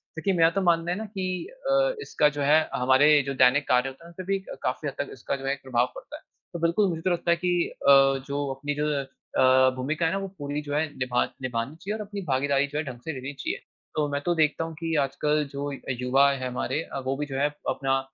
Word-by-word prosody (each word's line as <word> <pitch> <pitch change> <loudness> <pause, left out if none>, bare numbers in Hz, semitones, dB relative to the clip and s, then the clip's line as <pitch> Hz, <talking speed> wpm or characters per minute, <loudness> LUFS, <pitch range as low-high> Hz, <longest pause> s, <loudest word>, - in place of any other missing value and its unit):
क्योंकि 190 +4 0
मेरा 165 0 +6
तो 195 +3 -1
मानना 170 -1 +2
है 180 - -1
ना 220 - -4
कि 190 -3 -4 0.4
अ, - - +3
इसका 150 - +2
जो - - 0
है 150 +3 +5 0.2
हमारे 135 +4 +5
जो 135 - -1
दैनिक 140 +3 +3
कार्य 125 +1 +3
होते 135 +5 -14
हैं, - - -11
उनपे 180 +2 -8
भी 195 - +1
क - - -7
काफ़ी 150 - -1
हद 140 - -3
तक 145 - -2
इसका 130 +2 -3
जो 135 - -7
है 135 - +1
एक 140 - -8
प्रभाव 125 -1 +1
पड़ता - - -9
है। - - -18 0.3
तो 170 - -4
बिल्कुल 170 +5 +2
मुझे 165 -2 -3
तो 185 +1 +1
लगता 170 0 +1
है 170 - +3
कि 175 -1 0 0.2
अ, - - +10 0.4
जो 145 0 -2
अपनी 145 +2 -3
जो 150 +1 0 0.5
अ, 130 0 +6
भूमिका 150 +6 -1
है 160 - +2
ना 195 - 0
वो 195 0 -3
पूरी 145 0 -3
जो 145 -1 -6
है 155 +2 +2
निभा 125 -1 +1 0.2
निभानी 125 +2 -3
चाहिए 195 +6 -4
और 220 - -5
अपनी 200 0 -6
भागीदारी 140 +1 +2
जो 145 +1 -5
है 155 - 0
ढंग 125 -3 -7
से 160 - -2
लेनी 135 +1 -6
चाहिए, 135 - -3 0.4
तो 150 -1 +1
मैं 145 - -1
तो 175 - +2
देखता 155 0 +2
हूँ 165 0 -5
की 165 0 -2
आजकल 150 +2 0
जो 140 +1 -4 0.2
युवा 125 +3 +3
है 130 -2 -3
हमारे 125 +4 -2
अ, 135 - -6
वो 135 +1 0
भी 150 - -2
जो 135 -2 -7
हैं 145 +1 +3 0.2
अपना 135 -1 +1
145 Hz, 260 wpm, -26 LUFS, 135-165 Hz, 0.5 s, अ